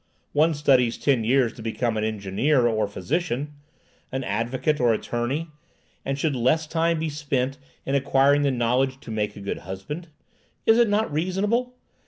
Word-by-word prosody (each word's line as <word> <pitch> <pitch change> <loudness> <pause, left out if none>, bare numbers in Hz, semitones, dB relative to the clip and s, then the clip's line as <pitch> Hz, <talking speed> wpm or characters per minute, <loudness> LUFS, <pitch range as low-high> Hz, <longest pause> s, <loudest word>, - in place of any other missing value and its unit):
One 155 +2 +3
studies 130 -5 +3
ten 130 -6 +2
years 125 0 +2
to - - -11
become 115 +1 -1
an 110 - -1
engineer 110 +6 +1
or 110 -3 +1
physician, 145 - -2 0.6
an 130 0 -2
advocate 120 +8 -1
or 120 -2 +4
attorney, 130 +9 -2 0.5
and 135 0 -2
should 145 0 0
less 130 +7 +2
time 165 +1 +1
be 160 +1 -2
spent 140 -3 -2 0.3
in 135 - -2
acquiring 140 +1 +3
the 140 - +2
knowledge 130 +2 +1
to 115 - -9
make 105 -1 -2
a 100 - -9
good 100 - -4
husband? 95 - -7 0.6
Is 225 +1 +5
it 235 -3 +4
not 205 -5 +1
reasonable? 205 +10 0
135 Hz, 165 wpm, -24 LUFS, 120-155 Hz, 0.6 s, Is